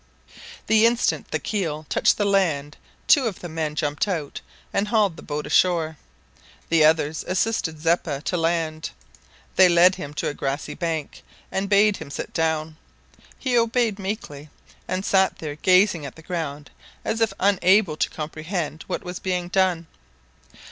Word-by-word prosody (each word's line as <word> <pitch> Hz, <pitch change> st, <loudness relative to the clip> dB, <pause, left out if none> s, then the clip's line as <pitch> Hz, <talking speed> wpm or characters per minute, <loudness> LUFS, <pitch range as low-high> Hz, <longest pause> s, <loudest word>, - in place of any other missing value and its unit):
The 220 Hz, +1 st, +5 dB
instant 235 Hz, +1 st, 0 dB
the -, -, 0 dB
keel 160 Hz, -7 st, -3 dB
touched -, -, +2 dB
the 205 Hz, -, +1 dB
land 160 Hz, -8 st, +1 dB, 0.3 s
two 270 Hz, -5 st, +5 dB
of 205 Hz, -, -5 dB
the 175 Hz, -, -5 dB
men 155 Hz, -2 st, -3 dB
jumped 150 Hz, +5 st, -1 dB
out 165 Hz, -8 st, -3 dB, 0.3 s
and 200 Hz, +1 st, +1 dB
hauled 210 Hz, -5 st, +2 dB
the -, -, -11 dB
boat 150 Hz, 0 st, -4 dB
ashore. 160 Hz, 0 st, +2 dB, 0.7 s
The 165 Hz, -2 st, +4 dB
others 155 Hz, 0 st, +2 dB
assisted 185 Hz, -4 st, -1 dB
Zeppa 165 Hz, -3 st, 0 dB
to 180 Hz, -, -1 dB
land. 165 Hz, -2 st, -1 dB, 0.7 s
They 185 Hz, -1 st, +7 dB
led 175 Hz, +2 st, +6 dB
him 150 Hz, -6 st, -7 dB
to -, -, -2 dB
a -, -, -2 dB
grassy 140 Hz, 0 st, -3 dB
bank, 160 Hz, -4 st, -4 dB, 0.3 s
and 195 Hz, +1 st, -2 dB
bade 205 Hz, 0 st, +4 dB
him -, -, -9 dB
sit 140 Hz, -, -6 dB
down. 160 Hz, -1 st, -1 dB, 0.6 s
He 255 Hz, -2 st, -1 dB
obeyed 230 Hz, -2 st, +2 dB
meekly, 190 Hz, -8 st, -5 dB, 0.4 s
and 185 Hz, +2 st, -2 dB
sat 190 Hz, -1 st, +2 dB
there 150 Hz, -2 st, -5 dB
gazing 185 Hz, +1 st, +3 dB
at 135 Hz, -, -11 dB
the 160 Hz, -, -14 dB
ground 155 Hz, -4 st, -5 dB, 0.3 s
as 220 Hz, +1 st, -1 dB
if 225 Hz, -, +3 dB
unable 190 Hz, -2 st, +3 dB
to -, -, 0 dB
comprehend 155 Hz, +1 st, -4 dB
what -, -, -3 dB
was 180 Hz, -1 st, -6 dB
being 180 Hz, -2 st, -2 dB
done. 185 Hz, -3 st, +1 dB
170 Hz, 160 wpm, -23 LUFS, 155-195 Hz, 0.7 s, They